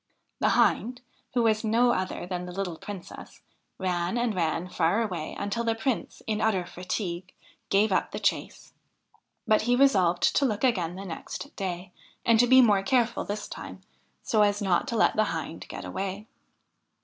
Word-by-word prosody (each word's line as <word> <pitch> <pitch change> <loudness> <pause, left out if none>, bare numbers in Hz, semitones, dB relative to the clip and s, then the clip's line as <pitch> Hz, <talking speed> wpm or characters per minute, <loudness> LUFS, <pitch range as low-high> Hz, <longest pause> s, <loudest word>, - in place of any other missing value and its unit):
The - - +2
Hind, 245 +2 +2 0.3
who 240 - +3
was 220 -1 +2
no 235 +3 +3
other 185 -4 -2
than 180 0 -4
the - - -6
little 180 -2 -3
Princess, 200 -4 -9 0.3
ran 180 +2 -1
and 240 -2 0
ran 165 -1 -1
far 180 +5 +1
away 180 -7 -4
until 205 +4 -2
the 225 -1 +1
Prince, 225 +2 -3
in 215 -1 -1
utter 200 -5 +1
fatigue, 180 0 -4 0.4
gave 205 +2 +3
up 185 - +1
the - - -6
chase; - - -2 0.7
but 215 -1 +4
he 245 +2 +2
resolved 190 -10 +3
to - - +3
look 215 -3 -1
again 180 -9 +1
the 195 +1 -7
next 195 - -7
day, 180 -2 -4 0.3
and 230 -1 +5
to 245 - +5
be 260 +1 +8
more 205 -4 +4
careful 240 +4 +1
this 205 0 -4
time, - - -9 0.4
so 215 - +2
as 205 0 +3
not 190 -4 +1
to 240 - -2
let - - +3
the 215 - +3
Hind 165 -2 -5
get - - -7
away. 195 +2 -4
205 Hz, 175 wpm, -27 LUFS, 180-230 Hz, 0.7 s, be